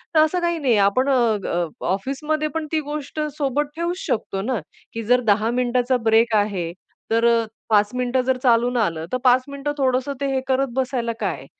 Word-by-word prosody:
तर - - +6
असं 315 +4 +3
काही 340 -1 0
नाहीये. 250 -7 +2
आपण 200 +8 +3
अ, 235 -5 +3
अ, 175 -1 0 0.3
ऑफिसमध्ये 300 +9 -2
पण 315 -1 -2
ती 315 - +1
गोष्ट 300 0 -5 0.2
सोबत 285 0 0
ठेऊच 340 +2 -2
शकतो 195 -3 -2
ना, 240 0 -1 0.3
की 230 0 -4
जर 250 +3 +3
10 215 +3 +2
मिनिटचा 250 +1 +1
ब्रेक 225 0 +4
आहे, 195 -5 0 0.4
तर 230 +1 +3
अ, 230 -1 +3 0.2
5 205 -1 +4
मिनिटं 250 +1 +1
जर 260 0 +1
चालून 245 0 +3
आलं, 165 -7 0
तर 255 - +1
5 255 0 +5
मिनिटं 280 +1 -3
थोडंसं 260 +1 0
ते 280 - 0
हे 265 - +1
करत 265 +1 +1
बसायला 255 -3 -1
काय? 185 -9 -3
250 Hz, 190 wpm, -22 LUFS, 225-275 Hz, 0.4 s, तर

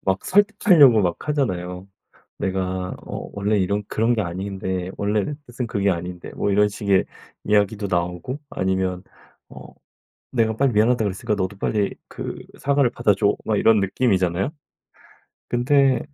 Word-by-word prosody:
막 95 0 -1
설득하려고 185 - +5
막 90 - -2
하잖아요. 90 -10 -2 0.5
"내가 95 -1 -2
어 - - -6
원래 100 +1 +1
이런 100 +2 0
그런 115 +2 +1
게 110 - 0
아닌데 95 0 -4
원래 105 +7 -1
뜻은 120 0 -4
그게 100 -3 0
아닌데." 90 0 -5
뭐 - - -1
이런 105 +1 +3
식의 100 -2 +1 0.4
이야기도 105 0 +1
나오고 90 - -2
아니면 95 - -1 0.5
어 - - -11 0.7
'내가 110 -3 +1
빨리 135 +1 +2
미안하다고 110 +2 +3
그랬으니까 100 +2 -2
너도 95 0 -3
빨리 100 0 0
그 - - -6 0.2
사과를 140 -3 +2
받아 105 - +2
줘.' 100 +1 +1
막 110 - 0
이런 110 0 +4
느낌이잖아요. 95 -3 +1 1.0
근데 135 +2 +3
100 Hz, 315 characters per minute, -22 LUFS, 95-120 Hz, 1.0 s, 설득하려고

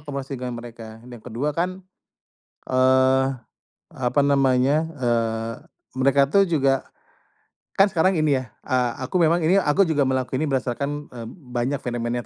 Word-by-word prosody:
komunikasi 140 -2 -6
dengan 125 -1 -4
mereka 115 -2 -10
yang 120 -2 -11
kedua 125 +6 -3
kan, 180 +4 -3 0.8
eee, 130 +1 +3 0.7
apa 130 +2 0
namanya, 140 +3 +2
eee, 115 -4 -1 0.4
mereka 140 +1 +3
tuh 195 +5 +2
juga, 135 -4 +2 1.0
kan 195 - +7
sekarang 185 -2 +1
ini 145 -4 +2
ya, 125 - -14 0.2
eee, 125 -2 +1 0.2
aku - - -17
memang 165 +1 +4
ini 180 - +4
aku 185 +6 +3
juga 155 -3 +1
melakukan 130 +1 -1
ini 155 - -1
berdasarkan, 135 +1 -1 0.2
eee, 115 -2 -7
banyak 125 -2 -3
fenomena 120 0 -3
130 Hz, 140 wpm, -23 LUFS, 125-150 Hz, 1.0 s, kan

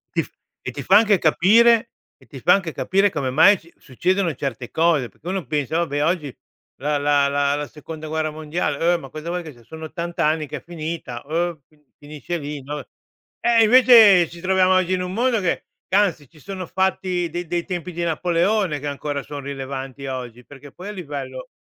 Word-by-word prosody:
Ti - - +2
f - - -16 0.3
e - - -5
ti - - -7
fa 195 - +6
anche 210 -2 +4
capire 225 +9 +4 0.3
e - - -22
ti 135 - -11
fa 180 - +5
anche 190 -4 0
capire 195 +2 +2
come 140 -5 -2
mai 175 +10 +6
si 170 - -20
succedono 180 +6 -1
certe 130 -3 -5
cose, 160 -6 +2
perché 145 - -16
uno 190 -1 -2
pensa: 150 0 -1
"Vabbè 145 -4 0
oggi 155 -5 -1 0.4
la 145 +2 0
la 145 0 +2
la 140 0 +1
la 145 0 -4
Seconda 155 +3 -9
Guerra 155 0 -2
Mondiale, 155 +1 -1
uh, - - -2
ma 135 - -10
cosa 155 +4 -7
vuoi 175 0 -3
che 160 - -9
sia 120 -4 -19
sono 160 +6 -9
80 170 +2 -6
anni 155 0 +1
che 150 - -5
è - - -10
finita". 160 -7 -6
Uh, 165 +1 -2
fin 150 -1 -30 0.2
finisce 150 +4 -6
lì 145 -2 -6
no, 145 +2 -5 0.6
eh 235 -1 +4
invece 220 -6 +7
ci 170 0 -12
troviamo 185 0 +3
oggi 185 0 +2
in 185 - 0
un 180 0 -5
mondo 240 +2 +1
che 180 - -1 0.2
che - - 0
anzi 175 -9 +1
ci 155 - -20
sono 190 +3 -6
fatti 185 -2 -1
dei 175 +1 -4
dei 175 +1 -2
tempi 180 -1 -4
di 170 +1 -3
Napoleone 175 +1 +1
che 145 - -5
ancora 145 0 -4
son 145 -1 -7
rilevanti 135 -1 -6
a 130 -1 -3
oggi, 125 -1 -9
perché 145 0 -13
poi 185 +7 -10
a - - -4
livello 140 -8 -7
160 Hz, 210 wpm, -22 LUFS, 145-185 Hz, 0.6 s, invece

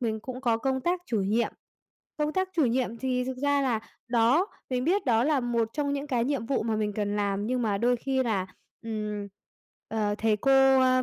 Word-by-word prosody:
mình 220 -3 -1
cũng 255 +2 -7
có 235 -4 +2
công 265 +2 -1
tác 350 +6 0
chủ 220 -4 0
nhiệm. 215 +5 +1 0.7
Công 300 0 0
tác 375 +2 0
chủ 310 - +4
nhiệm 240 -1 0
thì 250 0 -1
thực 260 0 -4
ra 285 +1 +2
là 240 -5 +1 0.3
đó 240 - +3 0.2
mình 250 0 0
biết 380 +6 +2
đó 230 -1 +3
là 295 -1 +2
một 235 -2 0
trong 285 0 -1
những 285 +1 -3
cái 245 -4 0
nhiệm 265 -4 -1
vụ 275 - 0
mà 220 -1 -1
mình 210 -1 -1
cần 205 0 -1
làm 200 0 -1
nhưng 250 +1 0
mà 205 -3 0
đôi 245 +2 +2
khi 265 +2 0
là, 205 -6 -1 0.4
ừm, 210 -2 -4 0.6
ờ, 210 -2 0
thầy 220 -1 +2
cô, 270 +3 +5
ơ, 255 0 +4
245 Hz, 220 wpm, -27 LUFS, 220-270 Hz, 0.7 s, cô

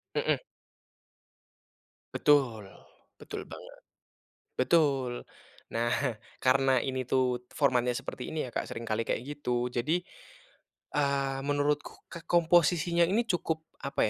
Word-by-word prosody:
Mhm. - - +2 1.7
Betul, 130 -8 +3 0.6
betul - - -6
banget, - - -11 0.8
betul. 135 -3 +3 0.6
Nah, 115 +1 +1 0.5
karena 130 0 +3
ini 130 -1 -1
tuh 125 -2 +2
formatnya 125 -4 +2
seperti 125 - -6
ini 155 -3 -2
ya - - -7
Kak, - - -2
sering 115 - -5
kali 110 0 0
kayak 115 - -1
gitu, 125 -4 -2
jadi, 150 +8 +1 1.0
eee, 140 -2 +1
menurutku 145 0 0 0.2
k 170 - -7
komposisinya 170 0 +4
ini 220 +5 +2
cukup 170 -6 -1 0.2
apa 140 -5 +1
140 Hz, 110 wpm, -30 LUFS, 125-155 Hz, 1.7 s, komposisinya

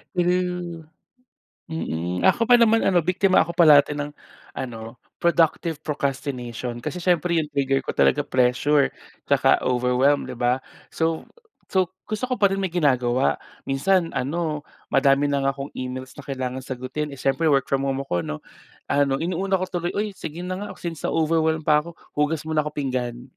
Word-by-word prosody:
True 180 -2 -1 0.8
mm, 90 - -2
ako 230 +1 +3
pa 245 - +8
naman 225 -1 +4
ano 175 -4 +2
biktima 185 -1 +3
ako 170 - -5
parati 150 -4 +6
ng 145 0 -4 0.5
ano 115 -2 -6 0.2
productive 165 -2 +2
procrastination 130 -4 -3
kasi 180 - -4
siyempre 175 -1 +1
yung 155 - +1
trigger 135 -1 +1
ko - - -2
talaga 145 +1 +3
pressure 130 +3 +2 0.4
tsaka - - +4
overwhelmed 125 +3 +2
'di - - -6
ba. 125 +1 +2 0.3
So, 160 0 -2 0.4
so 185 -1 +1 0.2
gusto 215 +3 -3
ko 255 0 -1
pa 200 - +6
rin 195 - -1
may 185 -3 -2
ginagawa. 130 -6 +2 0.3
Minsan 170 +5 +2
ano 150 +2 -2 0.3
madami 140 +1 +3
na 140 -1 +1
nga 135 - +3
akong 135 +1 -6
emails 130 0 -5
na 145 - -9
kailangang 130 -1 -4
sagutin, 135 +3 -4
eh, - - -10
syiempre 135 +4 +1
work 135 -2 +3
from 135 0 +1
home 135 0 -1
ako 90 -6 -1
'no, 75 - -4 0.5
ano 140 -1 +2
inuuna 190 +3 0
ko - - 0
tuloy, 175 -1 -2
"Uy 210 +1 -1
sige 165 +3 -6
na 185 - -3
nga, 205 - -5
since 165 -3 -6
sa - - +1
overwhelm 160 0 +1
pa 150 0 +4
ako, 170 - -9 0.2
hugas 150 +1 +1
muna 155 -1 0
ako 150 - -4
pinggan." 125 -2 -3
150 Hz, 170 wpm, -23 LUFS, 130-170 Hz, 0.8 s, pa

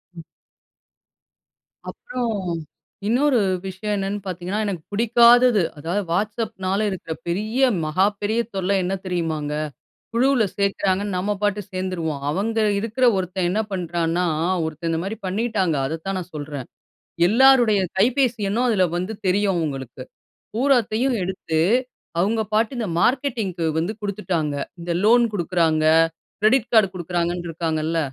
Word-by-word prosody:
ம். 165 - -9 1.7
அப்புறம் 250 -1 -4 0.8
இன்னொரு 255 +3 +3 0.3
விஷயம் 195 +3 -3
என்னென்னு 195 +1 -2
பாத்தீங்கன்னா, 185 +2 -3
எனக்கு 190 -5 -3
புடிக்காதது, 235 +1 +5 0.2
அதாவது 170 +7 -2
Whatsappனால, 205 0 -1
இருக்குற 175 -4 -5
பெரிய, 215 +9 -1 0.2
மகாப்பெரிய 205 +7 +1 0.2
தொல்ல 190 +1 +1
என்ன 180 +2 -1
தெரியுமாங்க? 160 -5 -2 0.6
குழுவுல 255 0 +3
சேக்கிறாங்கன்னு 200 0 0
நம்ம 195 +3 -1
பாட்டு 205 0 +1
சேந்துருவோம். 185 -5 -3
அவங்க 215 +8 -1 0.2
இருக்குற 225 +4 0
ஒருத்தன் 185 -1 -1
என்ன 210 +4 +1
பண்ணுறான்னா, 175 -1 -1 0.4
ஒருத்தன் 160 +1 -4
இந்த 160 - 0
மாரி 205 +4 -4
பண்ணிட்டாங்க. 195 -3 0
அதத்தான் 165 +5 -4
நான் 180 0 -8
சொல்றேன். 145 -3 -6 0.6
எல்லாருடைய 240 -1 +5 0.2
கைபேசி 240 +2 +2
எண்ணும் 240 +5 +1
அதில 195 -5 +3
வந்து 185 +5 -3
தெரியும் 195 +1 +2
அவுங்களுக்கு. 135 -5 -4 0.5
பூராத்தையும் 250 -1 +2
எடுத்து 180 -3 -2 0.6
அவுங்க 220 +5 +1
பாட்டு 220 +1 +2
இந்த 225 -4 -2
மார்க்கெட்டிங்க்கு 230 - 0
வந்து 170 +6 -1
குடுத்துட்டாங்க. 185 -7 -2 0.3
இந்த 170 +1 -3
லோன் 235 +3 +5
குடுக்குறாங்க 165 -4 +1 0.6
கிரெடிட் 225 +3 +3
காடு 220 -4 +6
குடுக்குறாங்கன்னு 175 0 -2
இருக்காங்கல்ல, 160 0 -1
195 Hz, 115 wpm, -22 LUFS, 175-220 Hz, 1.7 s, காடு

